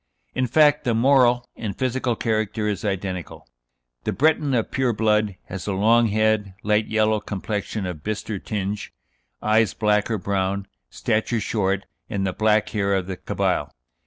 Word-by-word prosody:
In 130 0 0
fact, 150 +3 +4
the 120 -2 +1
moral 125 -1 +4
and 105 -4 -5
physical 130 -1 0
character 110 -1 -1
is 105 -3 -2
identical. 95 -4 -4 0.6
The - - -1
Breton 150 -1 +2
of 115 - 0
pure 130 -2 +1
blood 105 -2 +1
has 95 0 -7
a 100 - 0
long 115 +4 +4
head, 110 -2 +1
light 105 +1 +2
yellow 110 0 +2
complexion 105 0 -4
of 90 -4 -5
bistre 105 -1 -3
tinge, 100 -1 -3 0.5
eyes 110 0 +3
black 105 -1 +2
or 110 - 0
brown, 100 0 -1 0.2
stature 110 - 0
short, 100 -3 -1 0.2
and 100 -2 -1
the 95 - -1
black 110 0 +2
hair 100 -2 0
of 95 -2 -1
the 95 0 -4
Cabyle. - - -1
110 Hz, 160 wpm, -23 LUFS, 100-115 Hz, 0.6 s, fact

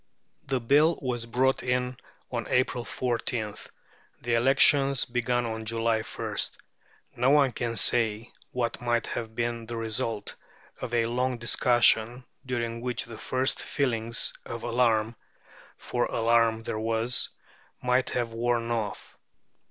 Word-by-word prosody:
The 135 -2 0
Bill 145 +7 +4
was 120 -3 -3
brought 130 +3 +1
in 125 0 -1 0.4
on 120 -2 -3
April 125 -1 +1
14th, 115 -3 -3 0.5
the 120 0 -2
elections 135 +2 +4
began 120 0 0
on 110 -1 -4
July 115 0 +1
1st; - - -1 0.6
no 125 +2 +3
one 140 -2 +5
can 115 -1 -3
say 115 +1 +2 0.2
what 120 -1 -2
might 120 -2 0
have 110 -1 -5
been 120 -1 -2
the 120 - -5
result 110 -1 -3 0.5
of 120 - -3
a 115 - +3
long 125 +2 -1
discussion, 120 0 +2 0.2
during 115 -3 -3
which 125 -1 -2
the 115 -2 -10
first 130 +1 +1
feelings 115 -4 0
of 115 - -7
alarm 115 -2 +1 0.6
(for 120 - -1
alarm 115 -1 +2
there 110 - -3
was) 115 +2 -1 0.5
might 125 +1 +2
have 120 -2 -2
worn 120 0 0
off. 110 -3 -4
120 Hz, 130 wpm, -27 LUFS, 115-125 Hz, 0.6 s, one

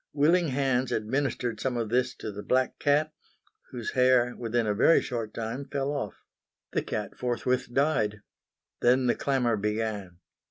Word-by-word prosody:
Willing 165 +4 +3
hands 130 -2 0
administered 120 0 -1
some 125 +1 -1
of 115 -2 -2
this 125 +1 +1
to 110 - -6
the 100 0 -7
black 130 +4 0
cat, 150 +2 +2 0.6
whose 120 -3 -5
hair, 125 -1 +3
within 120 0 -1
a 105 - +1
very 125 +10 +5
short 115 -3 -4
time, 115 +5 -4
fell 140 0 -2
off. 140 -8 -3 0.6
The - - 0
cat - - -4
forthwith 125 0 -1
died. 115 -7 +1 0.6
Then 125 +2 +3
the 120 - +3
clamour 125 -5 +1
began. 105 -3 -2
125 Hz, 155 wpm, -28 LUFS, 110-135 Hz, 0.6 s, very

